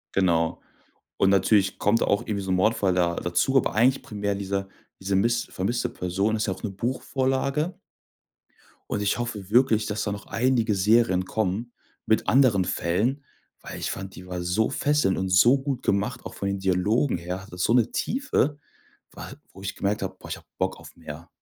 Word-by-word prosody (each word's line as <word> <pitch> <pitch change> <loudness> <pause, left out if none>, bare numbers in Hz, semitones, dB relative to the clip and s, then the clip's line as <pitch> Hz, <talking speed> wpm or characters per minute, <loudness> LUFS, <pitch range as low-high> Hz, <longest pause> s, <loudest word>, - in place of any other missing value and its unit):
Genau. 85 -4 +1 0.6
Und 95 - +4
natürlich 95 0 +3
kommt 105 +3 +2
da - - +2
auch 100 - +2
irgendwie 100 -2 -3
so 95 - -4
'n 95 - +3
Mordfall 100 -1 +2
da 85 -1 +2
dazu, 90 +11 0
aber 130 - +2
eigentlich 125 +5 +3
primär 100 -1 -3
dieser 100 0 -3 0.3
diese 95 +1 -2
miss 115 +4 +2
vermisste 115 +6 -2
Person, 95 +4 -1
ist 110 - -1
ja 95 - 0
auch 95 - -9
'ne 105 - -1
Buchvorlage. 130 - -1 1.1
Und 105 - -1
ich 100 +2 +1
hoffe 105 -5 -4
wirklich, 115 -2 +4
dass 105 +1 -2
da 105 - -2
noch 100 0 -7
einige 120 -3 +1
Serien 100 -2 +3
kommen 110 +4 -2 0.3
mit 110 - +1
anderen 120 -8 +4
Fällen, 100 +11 0 0.4
weil - - -8
ich - - -2
fand, 95 0 -7
die 90 - -11
war 90 -1 -4
so 90 +7 +1
fesselnd 145 -7 +1
und 95 0 -1
so 120 +9 +6
gut 135 -2 -3
gemacht, 105 +5 -1
auch - - -7
von 100 - -3
den 100 0 -2
Dialogen 95 +7 +1
her. 90 +2 -5
Hatte 95 -2 -12
so 90 +5 +2
'ne 120 -3 +3
Tiefe, 205 - 0 0.5
wa - - -9 0.2
wo 95 - -13
ich 100 - -4
gemerkt 100 +1 -1
hab: - - -5
„Boah, - - -11
ich - - -4
hab - - -18
Bock - - -1
auf - - -14
mehr.“ 80 0 -9
100 Hz, 195 wpm, -25 LUFS, 95-120 Hz, 1.1 s, so